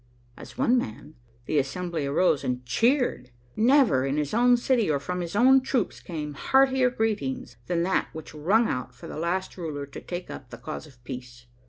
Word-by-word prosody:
'" - - -34
As - - -12
one 255 -1 +3
man, 145 - -7 0.3
the 150 - +1
assembly 160 +2 -2
arose 145 0 +2
and 125 0 -2
cheered. 235 - +1 0.3
Never, 240 - +4
in 135 +2 -1
his 150 -1 -1
own 245 +2 +5
city 240 -5 +1
or 145 -2 +2
from 180 +6 -3
his 170 +2 -5
own 260 +4 +6
troops, 255 -4 -1
came 150 -4 -5
heartier 265 - +3
greetings 200 - -2
than 170 -1 +1
that 190 +2 +1
which 160 0 -9
rung 195 +10 +2
out 125 0 -4
for - - -12
the - - -6
last 180 +4 -2
ruler 150 -5 -4
to 140 - -10
take 175 0 -6
up 130 - -9
the 120 - -9
cause 155 +5 -7
of 120 -4 -20
peace. 125 -1 -8
165 Hz, 195 wpm, -26 LUFS, 135-230 Hz, 0.3 s, own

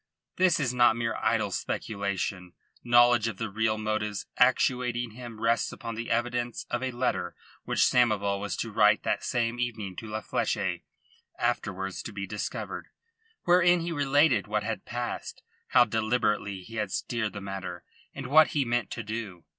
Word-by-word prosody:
This 185 -2 +4
is 130 -4 0
not 120 -2 +5
mere 115 -1 -1
idle - - +1
speculation. 100 -3 -3 0.3
Knowledge 120 -1 +5
of 110 -4 -4
the 110 -1 -4
real 110 +1 +1
motives 110 -1 -2
actuating 125 -1 +2
him 115 -1 -9
rests 115 +1 +1
upon 115 -1 -6
the 115 +1 -5
evidence 120 +1 -1
of 120 - -1
a 130 - -1
letter 125 0 -1 0.3
which - - 0
Samoval 105 -5 +2
was 105 -1 -3
to 115 - -3
write 105 0 +4
that - - 0
same 120 0 -1
evening 110 -6 -3
to 110 - -6
La 110 0 -4
Fleche - - -1 0.6
afterwards 95 -6 -2
to - - -7
be 100 -1 -5
discovered 105 +2 -5 0.6
wherein 175 0 +5
he 170 +1 -3
related 145 - +3
what 105 0 -1
had 115 +1 -4
passed, 120 0 -5 0.2
how 120 - +6
deliberately 110 -3 0
he 115 +4 -9
had 105 -3 -2
steered 110 -2 -2
the 100 - -5
matter, 95 -3 -6 0.3
and 135 - -7
what 155 +4 +6
he 145 -3 0
meant 120 -1 0
to 115 - -5
do. 105 -5 -6
115 Hz, 165 wpm, -28 LUFS, 105-120 Hz, 0.6 s, how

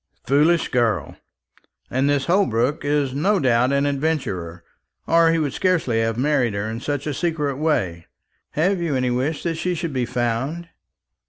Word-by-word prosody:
"Foolish 155 +5 +3
girl! 110 - 0 0.8
And 135 +2 +1
this 140 -2 +1
Holbrook 145 - +1
is 145 -2 0
no 195 +9 +2
doubt 125 -3 +2
an 140 0 +2
adventurer, 135 - -2 0.4
or 165 0 +4
he 165 - +2
would 150 -4 -1
scarcely 165 -11 +1
have 115 0 0
married 130 -5 +1
her 100 +2 -2
in 110 +1 -4
such 145 +2 -3
a 150 - -2
secret 150 -4 -1
way. 95 - -1 0.5
Have 180 +4 +1
you 165 -5 -1
any 125 -1 0
wish 135 +6 -1
that 165 -2 -2
she 180 +2 -1
should 165 -2 -4
be 125 -2 -1
found?" 125 +8 -2
140 Hz, 165 wpm, -22 LUFS, 120-160 Hz, 0.8 s, or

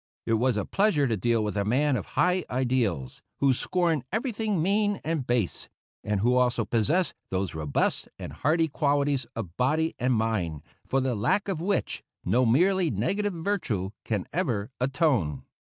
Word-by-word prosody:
It 115 - +1
was 120 +1 +2
a 105 - -1
pleasure 195 -8 +2
to 115 -4 +1
deal 115 +2 +1
with 105 -1 -2
a 100 - +1
man 135 +7 +2
of 105 - -3
high 180 0 +3
ideals, 120 - -1 0.2
who 135 -1 +4
scorned 170 0 0
everything 220 -3 -1
mean 205 +4 +1
and 155 -5 -2
base, 120 -6 -1 0.3
and 105 -2 -1
who 125 +3 +3
also 125 -2 +2
possessed 145 - +1 0.2
those 95 -1 -2
robust 75 -3 -1
and - - -7
hardy 160 +3 +2
qualities 140 -3 +1
of 95 -7 -6
body 155 +6 +1
and 125 0 +2
mind, 95 -10 -1 0.2
for 135 - +1
the 130 -1 0
lack 115 - +1
of 185 -5 -2
which 200 +3 -1 0.2
no 120 +7 +3
merely 180 +8 +3
negative 195 - -1
virtue 160 - -2
can 105 -5 -2
ever 125 - -1
atone. 125 - +1
130 Hz, 165 wpm, -27 LUFS, 110-165 Hz, 0.3 s, who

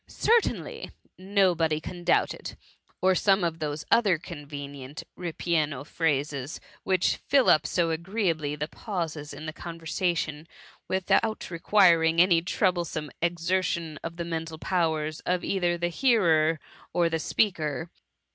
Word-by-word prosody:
^ - - -14
Certainly 465 0 +1 0.3
T 185 - -16
"Nobody 180 -6 +2
can 175 +2 -8
doubt - - +3
it - - -13
T - - -6 0.5
or 185 0 +5
some 195 0 +3
of 165 -1 -1
those 150 -1 -3
other 205 -7 +4
convenient 145 -3 -8
ripieno 155 -5 -1
phrases, 145 -3 -1 0.2
which 185 -2 +1
fill 275 -2 +3
up 155 - +3
so 170 -2 +1
agreeably 165 -4 -1
the 150 +1 -3
pauses 165 -7 -5
in 155 - -8
the 155 - -5
conversa 170 +1 -2
tion, 150 0 -4 0.4
without 190 +4 0
requiring 170 -2 +4
any 175 -2 +5
troublesome 175 -4 -1
exer 175 +2 +1
tion 165 -5 -3
of 165 0 -5
the 170 0 -4
mental 165 -1 -4
powers 160 -3 -1
of 180 0 -1
either 175 -3 0
the 175 0 -1
hearer 165 - +3 0.3
or 175 -1 +3
the 165 -1 -1
speaker. 160 -3 0
165 Hz, 145 wpm, -27 LUFS, 155-180 Hz, 0.5 s, or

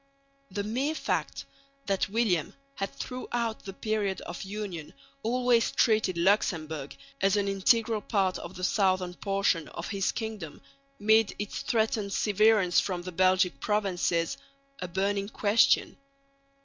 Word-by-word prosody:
The 205 - -3
mere 260 +9 -1
fact - - -2 0.4
that 195 -1 0
William 200 -7 0 0.2
had 195 -6 -4
throughout 240 -3 -4
the 195 - -6
period 205 -2 -1
of 175 - -7
union 190 -5 -6 0.3
always 245 0 +2
treated 215 -6 +2
Luxemburg 160 -6 0 0.3
as 195 +1 +3
an 200 -1 +1
integral 215 +3 +2
part 195 -4 0
of 170 +2 -9
the 185 - -7
southern 185 -2 +1
portion 195 -3 0
of - - -7
his 195 -2 0
kingdom 215 -9 -6 0.4
made 220 -1 +3
its 205 0 -4
threatened 220 -3 0
severance 210 -3 +3
from 180 -3 -2
the 185 - -6
Belgic 185 -4 +2
provinces 180 -5 0 0.4
a 180 - -4
burning 195 +2 -1
question. 215 0 +3
200 Hz, 130 wpm, -28 LUFS, 185-220 Hz, 0.4 s, as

